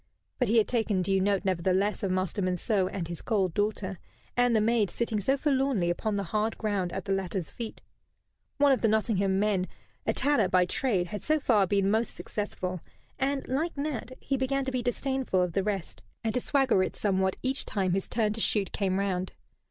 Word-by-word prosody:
But 250 - +2
he 230 - +3
had 220 - +4
taken 220 -6 +1
due 195 +1 +2
note, 200 0 +1
nevertheless, 190 +3 +1
of 195 - -1
Master 185 +2 -1
Monceux 185 +1 +1
and 175 -4 -3
his 170 -1 -6
cold 195 -6 0
daughter, 205 -2 -1 0.4
and 245 -1 +3
the - - +5
maid 220 -2 +2
sitting 225 0 -1
so 265 +8 +1
forlornly 265 - +1
upon 210 +4 -1
the 200 - -1
hard 215 +4 -1
ground 200 -5 -1
at - - -4
the 195 - 0
latter's 190 -2 -2
feet. 230 -2 -7 0.8
One 285 -1 +5
of 265 - +2
the 225 - +4
Nottingham 205 -3 +2
men, 200 -3 +1 0.4
a - - +4
tanner 275 -9 +2
by 180 0 +4
trade, 185 -3 0
had 205 0 -5
so 310 0 +2
far 215 -8 +3
been 195 0 +2
most 220 +1 0
successful, 185 -4 -4 0.4
and, 275 0 0
like 300 +5 -1
Nat, 280 -4 -3
he 275 - -1
began 270 +1 0
to 265 - -2
be 255 -1 -1
disdainful 260 -3 0
of 180 -2 -2
the 195 - +2
rest, 190 - -3 0.2
and 220 -1 0
to 250 - +1
swagger 270 -8 +3
it - - -1
somewhat 190 -2 +1
each 265 +2 0
time 190 -3 0
his 195 0 -1
turn 215 -3 0
to 225 - -3
shoot 205 -3 +1
came 190 -2 0
round. 190 -2 -1
210 Hz, 205 wpm, -28 LUFS, 190-245 Hz, 0.8 s, the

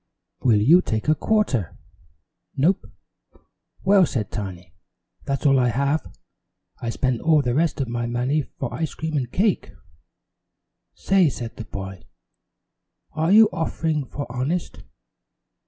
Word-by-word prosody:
"Will 115 -5 +3
you 160 +12 +6
take 110 -7 -3
a 155 - +5
quarter?" 155 - 0 0.8
"Nope." 165 +8 +1 0.9
"Well," 190 -2 +5
said 105 -6 -3
Tiny, 90 -5 -6 0.5
"that's 140 +1 -2
all 135 -2 +5
I 125 - +3
have. 140 +5 0 0.7
I 115 - -4
spent 125 0 -1
all 155 -3 +3
the 120 -2 0
rest 160 +2 +1
of 135 - -1
my 120 0 -3
money 125 +6 0
for 130 -2 -7
ice 160 -2 -3
cream 160 -1 -4
and 125 -4 -2
cake." 200 +1 0 1.2
"Say," 185 - +3
said 120 -3 -6
the 115 - -7
boy, 95 -2 -7 1.1
"are 160 +3 0
you 220 +1 +8
offering 160 -3 -1
for 145 - -5
honest?" 140 +8 -3
140 Hz, 135 wpm, -23 LUFS, 120-160 Hz, 1.2 s, you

